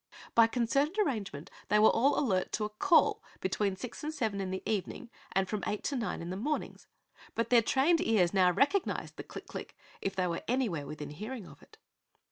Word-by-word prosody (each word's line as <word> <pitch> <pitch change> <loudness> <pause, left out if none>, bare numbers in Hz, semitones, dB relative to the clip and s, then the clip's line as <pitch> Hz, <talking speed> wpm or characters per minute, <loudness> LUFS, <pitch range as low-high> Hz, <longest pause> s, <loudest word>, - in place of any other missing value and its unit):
By 230 -1 +7
concerted 275 - +1
arrangement 215 - -2 0.2
they 210 - +3
were 215 +1 +7
all 275 +5 +3
alert 190 -9 0
to 215 - 0
a - - -3
"call" 325 - +3 0.2
between 190 +1 0
six 250 +8 -8
and 305 - -2
seven 220 -9 -2
in 190 - -3
the 190 0 -4
evening 220 +3 -3 0.2
and 190 0 +2
from 210 0 -3
eight 210 - -2
to 285 - -1
nine 225 -9 -2
in 170 - -5
the - - -3
mornings, 295 +9 -3 0.5
but 230 - -1
their 240 -1 +7
trained 280 +9 +3
ears 200 -6 +3
now 185 -2 +5
recognized 290 - 0
the - - -5
click - - -9
click! - - -8 0.2
if 195 0 -2
they 185 -2 +1
were 170 -1 -2
anywhere 220 - 0
within 150 0 -6
hearing 215 - -6
of - - -14
it. - - -19
215 Hz, 205 wpm, -31 LUFS, 190-260 Hz, 0.5 s, By